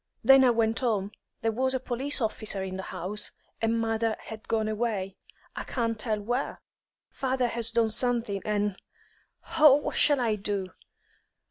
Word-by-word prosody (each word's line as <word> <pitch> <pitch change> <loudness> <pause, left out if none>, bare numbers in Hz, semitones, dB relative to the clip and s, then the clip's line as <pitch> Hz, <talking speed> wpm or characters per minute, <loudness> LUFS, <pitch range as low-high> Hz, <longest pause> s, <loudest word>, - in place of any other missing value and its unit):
Then 270 0 +7
I 255 - +6
went 225 -1 +1
home. 210 -5 0 0.3
There 225 - +2
was 260 +3 +1
a - - 0
police 260 +3 -2
officer 215 -3 -1
in 190 -1 -5
the 190 - -4
house, 205 +4 -4 0.3
and 225 0 +1
mother 225 0 0
had 220 0 -10
gone 220 -1 0
away, 215 -4 -2 0.4
I - - -4
can't 230 -3 -2
tell 215 -1 -1
where. 245 +6 -2 0.5
Father 260 -2 0
has 230 -1 +3
done 230 -1 +2
something, 230 -3 0
and 205 -2 -1 0.8
Oh, 300 -3 +9
what 290 - -2
shall 290 -2 +4
I 225 -4 +1
do? 195 -2 -3
225 Hz, 160 wpm, -28 LUFS, 210-245 Hz, 0.8 s, Oh